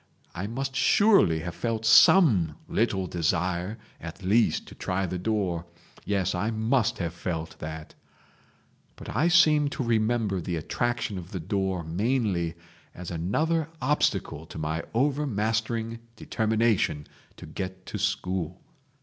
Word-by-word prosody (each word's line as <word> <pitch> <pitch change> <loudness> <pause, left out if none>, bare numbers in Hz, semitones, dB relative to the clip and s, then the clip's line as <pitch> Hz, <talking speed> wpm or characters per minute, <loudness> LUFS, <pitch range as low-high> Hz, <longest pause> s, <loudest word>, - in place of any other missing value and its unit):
I 90 +4 -4
must 135 +4 -4
surely 195 - +4
have 85 +1 -5
felt 110 +3 -2
some 110 - +6
little 100 -4 0
desire 90 +4 -1 0.2
at 85 +3 -9
least 110 +5 +2
to - - -11
try 95 +1 -2
the 90 0 -4
door—yes, 95 -1 -2
I 95 +5 -1
must 110 +1 +1
have 85 -2 -3
felt 85 -2 -5
that..... 80 0 -7 1.0
But - - -8
I 165 - +3
seem 155 -4 +5
to 135 - -3
remember 110 -4 +1
the 85 0 -3
attraction 105 +4 -2
of 90 0 -10
the 95 - -5
door 95 0 -1
mainly 90 -1 0 0.4
as 90 -1 -7
another 155 - 0
obstacle 125 - 0
to - - -10
my 80 +1 -2
overmastering 115 -4 0 0.2
determination 110 -10 0 0.3
to - - -10
get 95 -1 -6
to 105 - -5
school. 95 -3 -2
100 Hz, 130 wpm, -27 LUFS, 85-115 Hz, 1.0 s, some